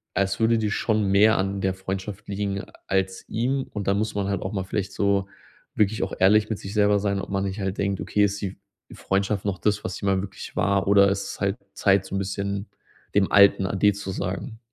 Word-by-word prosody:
als 100 -1 0
würde 115 0 +3
dir 110 -1 0
schon 110 -1 +1
mehr 105 +3 +5
an 95 +1 -1
der 95 -1 0
Freundschaft 95 +2 -6
liegen 100 0 -2 0.2
als 95 -1 -1
ihm. 130 +4 0
Und 100 -2 -4
dann 100 - +2
muss 110 +1 -1
man 100 -1 -1
halt 100 -2 -2
auch 95 - -3
mal 95 -2 -1
vielleicht 95 +1 -3
so 100 -1 +1 0.5
wirklich 105 0 +1
auch 95 - -4
ehrlich 105 +3 +4
mit 110 - -2
sich 95 +2 -7
selber 105 -1 +4
sein, 100 -1 0
ob - - -6
man 95 0 0
nicht 95 +2 -4
halt 95 0 -3
denkt: 100 -1 0
„Okay, 105 - +1
ist 100 0 -2
die 95 -1 -4 0.3
F - - -13
Freundschaft 100 +1 0
noch 100 -2 -1
das, 105 +2 0
was 90 - -4
sie - - -6
mal 95 -1 +2
wirklich 95 0 -8
war, 100 -1 +1
oder 100 0 +6
ist 100 0 -2
es - - -9
halt 100 +2 0 0.2
Zeit, 95 -1 +2
so - - -9
'n - - 0
bisschen 100 +1 -3 0.5
dem 100 -1 +3
alten 100 -1 +6
ade 100 +2 +3
zu 100 -1 -6
sagen?“ 95 +5 -4
100 Hz, 230 wpm, -24 LUFS, 95-105 Hz, 0.5 s, oder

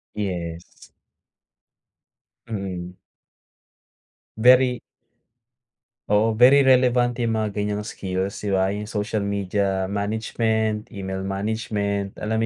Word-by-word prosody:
Yes. 85 -5 -4 1.8
Mm. 95 -4 -5 1.4
Very 125 +1 +5 1.3
oo, 110 +1 +2
very 135 +4 +7
relevant 125 -2 +3
yang 115 -2 0
mga 110 -1 0
ganyang 105 0 -2
skills 95 -2 -4
di 100 -2 -3
ba, 95 0 +2
yung 105 +1 -4
social 105 0 -2
media 100 -1 -1
management, 110 +1 -1
email 95 -1 -4
management. 100 0 -2
Alam 110 +1 0
105 Hz, 90 wpm, -23 LUFS, 95-110 Hz, 1.8 s, very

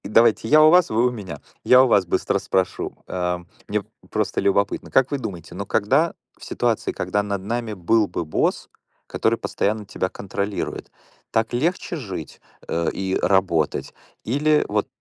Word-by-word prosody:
Давайте 110 +1 +3
я 155 +5 +7
у 155 - +8
вас, 180 0 +5
вы 115 +3 +2
у - - 0
меня. 100 -7 -7 0.2
Я 125 +1 +7
у - - +3
вас 100 -5 +4
быстро 85 - 0
спрошу. 95 -1 -1
Э, 90 -1 -1 0.3
мне - - -1 0.3
просто - - -1
любопытно. 100 +1 +1
Как 135 +1 +3
вы 140 - -1
думаете, 90 -9 -7
но 100 +3 -5
когда 135 +12 +2 0.2
в - - -16
ситуации, - - -1
когда 105 - -1
над 100 -1 -3
нами 115 +1 -3
был 105 +3 +2
бы 85 - -4
босс, 80 - -1 0.4
который - - 0
постоянно 105 +1 -2
тебя 95 -1 -2
контролирует, 100 +1 -4 0.4
так 115 +1 0
легче 170 +6 -1
жить, 95 - -7 0.3
э, 85 0 0
и 95 -1 -2
работать? 90 -5 +1 0.3
Или 150 +5 +2
вот - - 0
105 Hz, 165 wpm, -22 LUFS, 95-125 Hz, 0.4 s, у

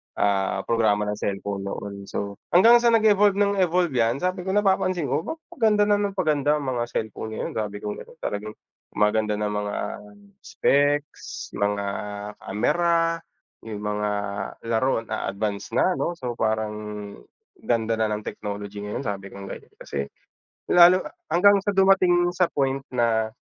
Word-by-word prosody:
ah, 100 -1 +1
programa 110 -3 +2
ng 105 - -3
cellphone 100 0 -3
noon. 100 0 -6
So, 100 0 -5 0.2
hanggang 230 +7 +8
sa 235 -1 +3
nag-evolve 210 -2 +5
ng 200 0 +2
evolve 180 -1 +2
yan, 120 +1 +1
sabi 185 0 -2
ko 190 - -1
napapansin 185 -6 +1
ko, 145 +5 -1
"'Ba - - -3 0.2
paganda 215 -4 +3
na 205 - +4
ng 200 -1 -1
paganda 150 -5 +2
ang 135 - -3
mga 120 -2 -1
cellphone 110 -1 -4
ngayon," - - -4
sabi 105 -1 -3
kong 105 0 -4
gano'n. - - -18
Talagang 105 +1 -4 0.4
maganda 105 +1 +2
na 105 0 -1
mga 105 0 -3 0.7
specs, 145 +1 0
mga 100 0 0 0.5
camera, 165 - +1 0.5
yung 105 -2 -6
mga 105 0 -1 0.6
laro 115 +1 +1
na 110 -1 -4
advance 100 0 -3
na, 185 - +2
'no? 175 - -1
So, 125 -6 -4
parang 110 -1 0 0.9
"Ganda 115 -1 0
na 110 - +2
ng 105 0 -3
technolog 100 -1 -6
ngayon," 105 +5 -5
sabi 100 -3 -4
kong 100 0 -9
ganyan, - - -10
kasi 70 -1 -5 0.6
lalo 180 +1 +7 0.3
hanggang 200 +3 +6
sa 205 - +2
dumating 185 -2 +4
sa 180 0 +4
point 135 -1 0
na 110 -2 +1
115 Hz, 155 wpm, -24 LUFS, -, 0.9 s, hanggang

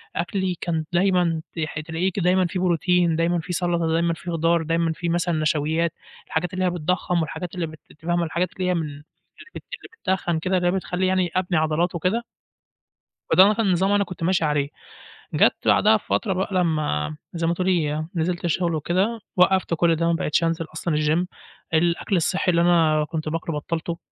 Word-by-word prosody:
أكْلي 185 +1 -1
كان 160 -3 -1
دايمًا 175 -3 +2 0.2
تح 155 -1 -3
تلاقيه 165 +4 -2
ك 195 - -4
دايمًا 185 +1 +3
فيه 180 +2 -3
بروتين، 175 -1 +2
دايمًا 170 +1 +1
فيه 170 +2 -5
سلطة، 170 -1 0
دايمًا 165 +1 +1
فيه 170 +1 -6
خضار، 165 0 +2
دايمًا 165 +1 0
فيه 170 +1 -3
مثلًا 175 0 0
نشويات، 155 +2 0 0.3
الحاجات 175 +3 -2
اللي 185 0 0
هي - - +3
بتضخّم 175 0 0
والحاجات 180 +3 -5
اللي 175 -2 -1
أنتِ 155 0 -14
فاهمة 175 0 +1
الحاجات 170 +2 -2
اللي 185 -1 -2
هي - - +2
من 170 - 0
اللي 145 0 -10 0.5
بت - - -7
اللي - - -8 0.3
بتتخّن 175 -3 -2
كده 185 +3 0
اللي 175 -1 +1
هي 175 - +3
بتخلي 185 -1 -1
يعني 185 -2 +1
أبني 185 -1 +1
عضلات 160 +3 +1
وكده. 185 +8 0 1.1
فده 195 +3 +7
كان 215 -3 +1
نظام 190 +3 +2
أنا 205 0 +3
كنت 180 -3 -8
ماشي 175 -1 +2
عليه، 145 -2 0 0.6
جَت - - +4
بعدها - - +5
بفترة 195 -5 -1
بقى 190 +2 -2
لمّا 155 - 0 0.2
زي 165 -1 -1
ما 170 - +2
تقولي 165 -4 0
نزلت 175 +2 -1
الشغل 170 0 0
وكده، 185 +9 0 0.2
وقُفت 185 -1 +3
كُلّ 165 0 +3
ده 165 +1 -1
ما 170 - +2
بقيتش 165 0 0
أنزل 165 0 0
أصلًا 160 0 -2
الgym 155 +4 +1 0.5
الأكل 170 +4 +1
الصحّي 180 +2 +1
اللي 170 -1 +2
أنا 160 -3 +3
كنت 155 -1 -3
باكلُه 165 0 -3
بَطَّلتُه، 165 +2 -3
170 Hz, 190 wpm, -23 LUFS, 160-180 Hz, 1.1 s, فده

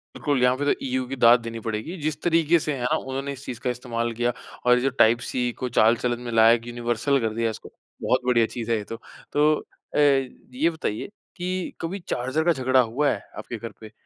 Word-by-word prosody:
बिल्कुल 145 -4 0
यहाँ 125 0 +4
पे 145 - -2
तो 145 - +3
EU 130 -1 -1
की 135 - -3
दाद 120 -1 +6
देनी 115 0 -6
पड़ेगी, 110 - -4
जिस 155 0 -2
तरीके 165 -1 +3
से 150 -1 -2
है 130 - -5
ना, 125 - +2
उन्होंने 135 +1 -4
इस 135 0 -10
चीज़ 120 -2 -6
का 125 - -1
इस्तेमाल 120 -1 -2
किया 120 +1 0 0.3
और 125 - +6
ये 125 - 0
जो 135 - +2
टाइप-सी 120 0 +2
को 125 - -2
चाल-चलन 120 +1 +2
में 120 -1 -5
लाया, 115 +1 +6
यूनिवर्सल 120 +3 0
कर 110 -1 -1
दिया 115 0 0
इसको, 110 - -8 0.3
बहुत 125 - +2
बढ़िया 120 -2 +4
चीज़ 120 -1 -4
है 115 - +3
ये 105 - -4
तो। 115 +2 -7 0.4
तो 150 +1 +4 0.4
अ, - - +2
ये 135 +1 +1
बताइए 160 -10 -4 0.3
कि 180 +1 -3
कभी 175 +5 -3
चार्जर 130 +6 -1
का 175 - +5
झगड़ा 130 -1 +2
हुआ 125 +5 +2
है? - - -1 0.2
आपके 120 - -6
घर 115 +1 -7
पे। 110 0 -11
125 Hz, 220 wpm, -24 LUFS, 115-140 Hz, 0.4 s, दाद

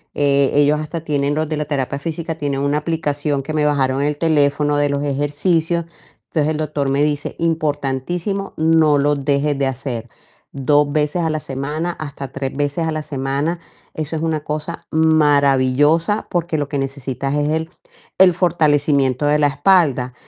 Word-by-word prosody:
Eh, 140 -1 +3
ellos 145 +1 +4
hasta 165 +1 -5
tienen, 145 -2 0
los 155 +1 -1
de 155 0 -3
la 150 - -2
terapia 140 -1 -2
física, 165 +2 -4
tienen 140 -2 -1
una 145 +1 +1
aplicación 150 -3 -2
que 155 +3 -5
me 150 -1 +1
bajaron 135 -2 +1
el 145 0 0
teléfono 145 -2 +2
de 145 0 +2
los 140 0 -1
ejercicios. 155 +4 0 0.4
Entonces, 155 -1 -1
el 155 - -2
doctor 150 -2 -2
me 140 +2 +2
dice: 150 -1 -2
"Importantísimo, 165 +4 -2
no 160 -2 +4
lo 145 +1 +2
dejes 140 +1 0
de 135 - +1
hacer 125 -3 -4 0.4
2 145 +1 +2
veces 150 +3 0
a 160 - 0
la 155 - -1
semana, 150 +5 -3
hasta 145 -4 -7
3 135 -1 -4
veces 145 +3 -1
a - - -1
la 155 0 -3
semana, 145 +3 -2 0.3
eso 155 +1 -4
es - - -4
una 160 -2 -1
cosa 155 +2 -4
maravillosa, 150 +2 +3
porque 170 -2 -1
lo 145 -1 -2
que 140 - -2
necesitas 135 0 -3
es 145 0 0
el 160 +1 -1 0.5
el 185 -1 +6
fortalecimiento 145 -6 +2
de 150 +1 +3
la 145 - +4
espalda". 145 -4 +2
145 Hz, 170 wpm, -19 LUFS, 140-160 Hz, 0.5 s, el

